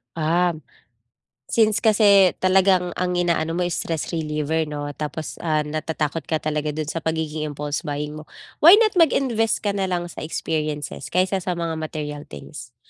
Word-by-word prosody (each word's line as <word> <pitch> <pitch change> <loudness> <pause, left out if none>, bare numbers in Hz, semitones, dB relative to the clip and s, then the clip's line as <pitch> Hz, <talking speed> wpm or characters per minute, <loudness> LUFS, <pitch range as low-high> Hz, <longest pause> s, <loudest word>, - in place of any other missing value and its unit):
Um. 165 0 +1 0.8
Since 215 -2 +3
kasi 200 -4 +5
talagang 185 -1 +3
ang 180 0 0
inaano 170 -2 0
mo 180 - 0
stress 165 -1 -3
reliever, 155 0 -1
'no, 145 -1 -4
tapos, 150 +1 -6
ah, 155 -2 0
natatakot 155 +1 -2
ka 160 -1 -1
talaga 150 -1 -2
dun 155 -1 -3
sa 165 - -3
pagiging 160 -1 -2
impulse 150 +2 -4
buying 150 +1 -4
mo. 155 - -13 0.3
Why 340 +6 +9
not 430 -4 +3
mag-invest 240 -8 +2
ka 205 - +1
nalang 180 -3 -2
sa - - -9
experiences 155 -2 -3
kaysa 185 +2 +1
sa 180 -1 -3
mga 165 -2 -3
material 150 -2 -5
things? 120 -4 -10
160 Hz, 155 wpm, -22 LUFS, 150-185 Hz, 0.8 s, Why